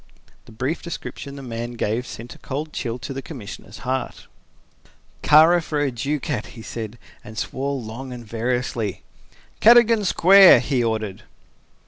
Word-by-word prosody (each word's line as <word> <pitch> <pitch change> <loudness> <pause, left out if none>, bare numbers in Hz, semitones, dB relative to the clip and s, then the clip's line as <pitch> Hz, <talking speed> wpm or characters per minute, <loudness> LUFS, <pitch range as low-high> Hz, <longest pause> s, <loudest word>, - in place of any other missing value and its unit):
The - - -15
brief 130 +9 -3
description 140 -4 -7
the 140 - -9
man 120 -1 -5
gave 115 +1 -2
sent 120 +2 -9
a - - -17
cold 150 +3 -5
chill 120 -1 -3
to 135 +3 -7
the 135 - -5
Commissioner's 125 -9 -9
heart. 130 +1 -3 1.0
"Kara 160 +4 +6
for 155 -2 -3
a 145 -2 0
ducat!" 135 -1 -3
he 110 - -9
said, 115 0 -6 0.3
and 110 +1 -11
swore 135 +5 -3
long 120 +3 -8
and 120 -1 -8
variously. 115 -2 -2 0.6
"Cadogan 230 -1 +6
Square," 190 +1 +7
he 130 -4 0
ordered. 110 -4 -2
130 Hz, 145 wpm, -22 LUFS, 115-150 Hz, 1.0 s, Square